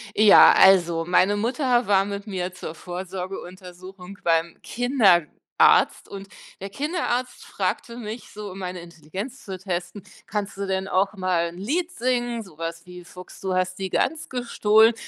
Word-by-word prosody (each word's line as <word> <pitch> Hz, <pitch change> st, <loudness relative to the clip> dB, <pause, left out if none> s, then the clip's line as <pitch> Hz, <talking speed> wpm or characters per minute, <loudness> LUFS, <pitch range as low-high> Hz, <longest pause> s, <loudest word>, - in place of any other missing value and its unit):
Ja, 210 Hz, -1 st, +8 dB
also, 175 Hz, -3 st, +5 dB
meine 185 Hz, +3 st, +3 dB
Mutter 245 Hz, +1 st, 0 dB
war 195 Hz, -1 st, +3 dB
mit 200 Hz, +1 st, -6 dB
mir 185 Hz, -2 st, -4 dB
zur 165 Hz, -3 st, -8 dB
Vorsorgeuntersuchung 185 Hz, +1 st, -8 dB
beim 165 Hz, 0 st, +1 dB
Kinderarzt 220 Hz, -, +2 dB
und 195 Hz, 0 st, -9 dB, 0.3 s
der 195 Hz, -, -5 dB
Kinderarzt 255 Hz, -, -3 dB
fragte 235 Hz, 0 st, -3 dB
mich 225 Hz, 0 st, -7 dB
so, 210 Hz, -2 st, -8 dB
um 190 Hz, -, -9 dB
meine 180 Hz, -1 st, -5 dB
Intelligenz 175 Hz, -, -8 dB
zu 190 Hz, -2 st, -6 dB
testen: 185 Hz, +1 st, -5 dB, 0.2 s
„Kannst 205 Hz, -1 st, -4 dB
du 200 Hz, -, -3 dB
denn 190 Hz, 0 st, -2 dB
auch 195 Hz, +1 st, +1 dB
mal 185 Hz, -4 st, 0 dB
'n 170 Hz, -, -12 dB
Lied 320 Hz, -, -2 dB
singen, 240 Hz, -2 st, -1 dB
so 185 Hz, -7 st, -17 dB
was 165 Hz, +1 st, -6 dB
wie 180 Hz, 0 st, -11 dB
‚Fuchs, 180 Hz, +1 st, -13 dB
du 190 Hz, -1 st, -2 dB
hast 185 Hz, 0 st, -1 dB
die 190 Hz, -1 st, -3 dB
Gans 320 Hz, -, -1 dB
gestohlen?'“ 225 Hz, -3 st, +3 dB
195 Hz, 155 wpm, -24 LUFS, 180-220 Hz, 0.3 s, Ja